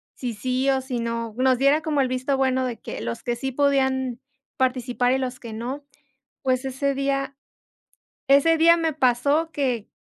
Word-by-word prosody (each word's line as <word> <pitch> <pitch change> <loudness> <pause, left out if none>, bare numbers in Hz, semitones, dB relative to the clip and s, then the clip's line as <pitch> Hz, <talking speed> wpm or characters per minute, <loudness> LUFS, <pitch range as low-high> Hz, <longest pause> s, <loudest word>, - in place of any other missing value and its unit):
si 245 -3 -4
sí 255 +5 -1
o 265 -1 +2
si 255 -2 -4
no, 230 -1 -3
nos 255 -1 +3
diera 280 +3 +4
como 300 -3 0
el 260 - 0
visto 255 +2 -1
bueno 260 -1 +1
de 240 -2 -3
que - - -7
los 115 0 -5
que 240 -1 -1
sí 265 +1 -3
podían 265 -3 +1 0.4
participar 255 -1 +1
y - - +2
los 255 -1 -4
que 230 -2 -8
no. 260 +6 -5 0.6
Pues 255 0 0
ese 270 +1 -1
día 275 0 -2 0.9
ese 320 +4 +5
día 335 +1 +6
me 325 -2 0
pasó 285 +5 +1
que 250 -7 -2
260 Hz, 180 wpm, -24 LUFS, 250-275 Hz, 0.9 s, día